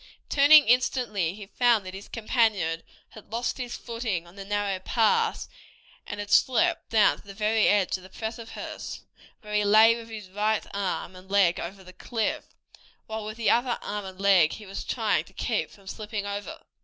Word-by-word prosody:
Turning 290 +1 +7
instantly 235 -7 +1
he 210 -1 -9
found 230 -1 +2
that 185 - -7
his 195 +1 -9
companion 215 -8 0 0.3
had 215 -1 -15
lost 235 +3 -2
his 245 -1 -4
footing 230 -7 -3
on 170 +2 -17
the 200 - -7
narrow 200 -1 -1
pass, 255 - +1 0.6
and 205 - -6
had 205 0 -6
slipped 335 +6 +3
down 220 -2 +4
to - - -17
the 200 - -10
very 215 +1 +2
edge 205 -3 +3
of - - -15
the 185 - -13
precipice, 225 +3 -7 0.4
where 210 -2 -9
he 210 0 +2
lay 220 +3 +6
with 230 -1 -9
his 210 -4 -9
right 210 +2 0
arm 190 -2 -3
and 185 +1 -14
leg 195 -3 +3
over 190 +3 -7
the 185 0 -13
cliff, 220 +4 -2 0.6
while 220 0 -5
with 215 +1 -7
the 220 -3 +2
other 240 +1 +1
arm 205 -1 -4
and 190 0 -10
leg 190 -5 +4
he 215 - -9
was 195 0 -6
trying - - 0
to - - -20
keep - - -1
from 200 - -19
slipping 210 0 -5
over. 205 +11 -5
210 Hz, 190 wpm, -26 LUFS, 195-230 Hz, 0.6 s, Turning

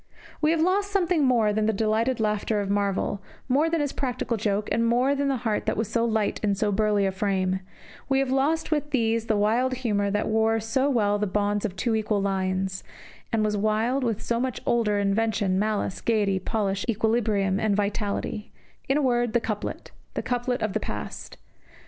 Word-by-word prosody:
We 305 - +3
have 325 0 +2
lost 390 +4 +2
something 360 -5 +1
more 230 -5 +3
than 215 0 +1
the - - +3
delighted 220 +4 +1
laughter 210 0 0
of 200 -1 -2
Marvell, 200 0 0 0.3
more 285 +5 +2
than 330 -1 0
his 290 -2 -1
practical 250 -3 -2
joke, 210 -1 -1
and 230 - +2
more 250 +4 +3
than 280 0 0
the 270 -1 +1
heart 215 -2 -1
that - - 0
was 220 +1 -3
light 225 -2 +1
in 205 -2 +1
so 205 +1 0
burly 205 0 +2
a 195 - +1
frame 190 -1 0 0.5
we 270 - +3
have 270 -1 +1
lost 300 +5 +1
with 295 -1 0
these 230 -4 0
the 215 - +2
wild 235 +5 +2
humour 205 -2 +1
that 210 +1 0
wore 220 +1 +2
so 260 +6 0
well 205 -6 +2
the 210 - 0
bonds 205 +2 0
of 195 -3 -3
two 235 +1 0
equal 215 -1 0
lines, 190 -1 -1 0.5
and 220 -2 +1
was 210 0 0
wild 215 +6 +1
with 225 -3 -1
so 235 0 0
much 255 -3 -2
order, 225 -3 +2
invention, 200 -1 +1
malice, 210 -2 -1
gaiety, 205 -4 +1
polish, 200 0 -1
equilibrium, 215 -3 +1
and 215 -2 +1
vitality 205 +1 -2 0.4
in 270 - +3
a 300 - +1
word, 240 -3 +1
the 240 - +4
Couplet, 215 -2 -5 0.2
the - - -2
couplet 245 0 -1
of 215 -3 -1
the - - 0
past. 105 - -6
220 Hz, 195 wpm, -25 LUFS, 205-245 Hz, 0.5 s, the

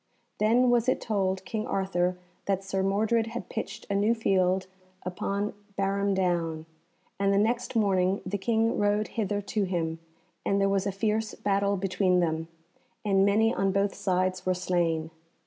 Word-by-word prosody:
Then 240 +4 +4
was 240 0 +3
it - - +1
told 190 -3 -1
King 215 +2 -3
Arthur 180 -2 0 0.3
that 195 -1 0
Sir 195 0 -1
Mordred 220 +4 +1
had 235 +1 -6
pitched 225 - -5
a - - -2
new 210 +4 +3
field 190 -3 +2 0.4
upon 200 +3 -2 0.2
Barham 200 0 +1
Down, 170 -4 0 0.5
and 200 0 +2
the 200 - +3
next 235 +4 0
morning 195 -3 +2
the 200 +2 -2
King 225 +2 +1
rode 205 +1 +1
hither 205 -2 -1
to 205 +1 -1
him, 165 -3 -2 0.4
and 200 - +1
there 195 - +3
was 195 0 +1
a - - 0
fierce 215 +2 -1
battle 200 0 +1
between 185 -1 +2
them, 160 -1 0 0.6
and 195 -1 +4
many 220 +3 +3
on 195 -4 +1
both 200 0 +1
sides 185 -1 0
were 185 0 +1
slain. 170 -3 0
195 Hz, 165 wpm, -28 LUFS, 185-210 Hz, 0.6 s, Then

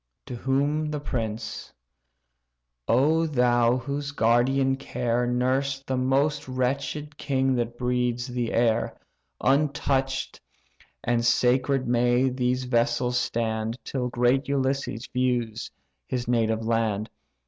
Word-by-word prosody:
To 125 - -6
whom 145 +5 0
the 150 -1 -3
prince: 115 -5 -4 1.2
"O 155 +7 +3
thou 120 -3 +3
whose 140 +3 -4
guardian 130 +2 +2
care 125 -2 -1
Nursed 130 +2 0
the 130 - -1
most 135 +4 +1
wretched 140 +3 -2
king 135 -1 +1
that 120 0 -2
breathes 125 -1 0
the 125 -2 -3
air; 115 -1 +1 0.4
Untouch'd 135 -1 0 0.6
and 120 0 +1
sacred 130 +2 +2
may 120 +2 +3
these 125 0 0
vessels 120 0 +1
stand, 110 -1 -2
Till 125 -2 -2
great 125 +3 +2
Ulysses 135 -3 -1
views 120 -3 -1 0.4
his 125 -2 -3
native 110 -2 +1
land. 110 -2 0
125 Hz, 110 wpm, -26 LUFS, 120-135 Hz, 1.2 s, O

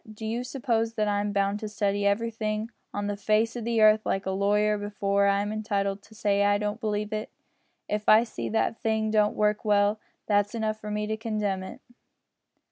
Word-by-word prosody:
Do 215 +1 -8
you 230 +3 -2
suppose 230 -3 -1
that 215 -1 0
I'm 205 0 0
bound 200 0 0
to 215 - -5
study 205 -1 0
everything 220 +1 -1 0.2
on 205 0 -3
the 205 0 -2
face 215 +3 +1
o' 240 - -4
the 230 0 0
earth 215 0 +6
like 195 0 -1
a 190 - -1
lawyer 205 +2 +2
before 200 -1 0
I'm 200 +1 +1
entitled 200 -2 -1
to 205 +2 -18
say 200 -1 +1
I 205 0 +3
don't 210 +2 -3
believe 210 -1 -2
it. 215 0 -3 0.6
If 210 0 -1
I 215 +2 +7
see 235 - -5
that 220 - +1
a - - -14
thing 220 -2 -1
don't 210 -1 +2
work 210 +1 +1
well, 205 0 +2 0.3
that's 205 +1 +1
enough 215 -1 -2
for 210 - -7
me 210 0 -2
to 220 +1 -2
condemn 210 -4 -2
it." 190 - -9
210 Hz, 205 wpm, -27 LUFS, 205-220 Hz, 0.6 s, I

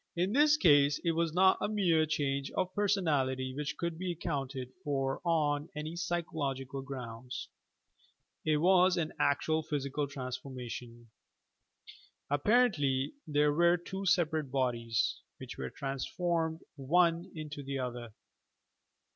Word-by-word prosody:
In 180 +4 0
this 295 +2 +5
case 145 - +5
it 170 - +2
was 165 0 0
not 190 +3 +4
a - - +1
mere 175 -7 +2
change 140 -2 -1
of 185 0 0
personality 145 -11 +1
which 145 0 -3
could 170 -1 -3
be 180 -1 -2
accounted 135 -6 -4
for 135 -3 -1
on 155 -2 +1
any 155 +2 -5
psychological 145 -7 -3
grounds; 125 -2 -7 0.9
it 155 -1 +2
was 180 +3 +4
an 160 -2 -1
actual 155 +2 +2
physical 145 -2 -2
transformation. 125 -3 -7 1.2
Ap 145 -1 0
parently 150 - +3
there 150 -1 +3
were 170 +3 +4
two 190 +3 -5
separate 160 -5 +2
bodies, 120 -4 0 0.2
which - - -9
were 65 - -3
transformed 160 - -2 0.2
one 170 +5 +2
into 155 -2 -6
the 140 0 -4
other 120 -3 -4
150 Hz, 125 wpm, -32 LUFS, 135-170 Hz, 1.2 s, this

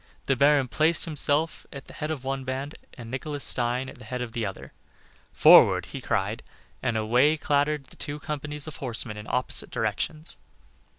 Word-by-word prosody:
The 135 - +2
baron 140 0 +4
placed 155 +6 +2
himself 155 0 -1
at 140 -1 -9
the - - -13
head 150 - -4
of 150 -5 -4
one 135 0 -3
band 135 +3 -4 0.2
and 115 -2 -9
Nicholas 145 +2 -4
Stein 125 +2 0
at 125 - -11
the 120 - -12
head 125 +3 -4
of 125 -2 -4
the 115 -2 -2
other. 95 - -9 0.6
"Forward!" - - +7
he - - -8
cried, - - -1 0.4
and 120 -3 0
away 125 +8 +3
clattered 145 0 +1
the - - -17
two 145 -1 -5
companies 150 0 -5
of 155 - -8
horsemen 120 -4 -2
in 105 0 -9
opposite 125 0 0
directions. 110 - -3
135 Hz, 180 wpm, -26 LUFS, 120-150 Hz, 0.6 s, Forward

